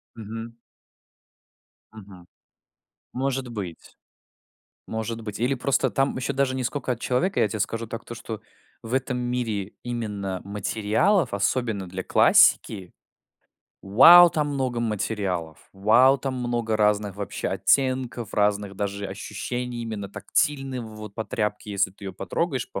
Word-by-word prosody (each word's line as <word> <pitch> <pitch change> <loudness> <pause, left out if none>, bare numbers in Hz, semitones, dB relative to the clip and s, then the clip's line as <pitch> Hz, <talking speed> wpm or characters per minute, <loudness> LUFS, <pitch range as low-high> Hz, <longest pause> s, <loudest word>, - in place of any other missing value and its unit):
Мгм. 115 +1 -7 1.4
Мгм. 95 -5 -13 0.9
Может 135 0 -1
быть. 95 -8 -8 0.9
Может 110 +1 -4
быть. 105 -2 -6
Или 125 +4 +1
просто 135 +2 +1
там 135 +1 +1
еще 130 +2 -2
даже 135 -1 +1
не 130 - -2
скока 130 0 -2
от 115 - -10
человека. 170 +12 0
Я - - +4
тебе 105 +1 -5
скажу 115 +3 -2
так, 115 0 -7
то 120 - -8
что 115 -2 -7 0.4
в 115 +2 -7
этом 130 -1 0
мире 120 -5 -2
именно 105 -6 -4
материалов, 110 - +1
особенно 100 -1 -1
для 95 +1 -5
классики- 95 -4 +4 0.9
вау, 165 - +9
там 150 -2 0
много 130 -4 -1
материалов! 100 -7 -3
Вау, 115 +8 +5
там 135 +1 -3
много 120 -3 -1
разных 105 -2 +1
вообще 100 -2 -4
оттенков, 130 -4 0
разных 105 -1 +1
даже 100 0 -3
ощущений 120 +5 -5
именно 110 -3 -5
тактильной, 135 +4 -1
вот, 110 -3 -9
по 110 - -3
тряпке, 105 -1 -3
если 100 -1 +1
ты 100 - -14
ее 95 - -5
потрогаешь, 125 - -2
по - - -4
115 Hz, 135 wpm, -25 LUFS, 100-125 Hz, 1.4 s, вау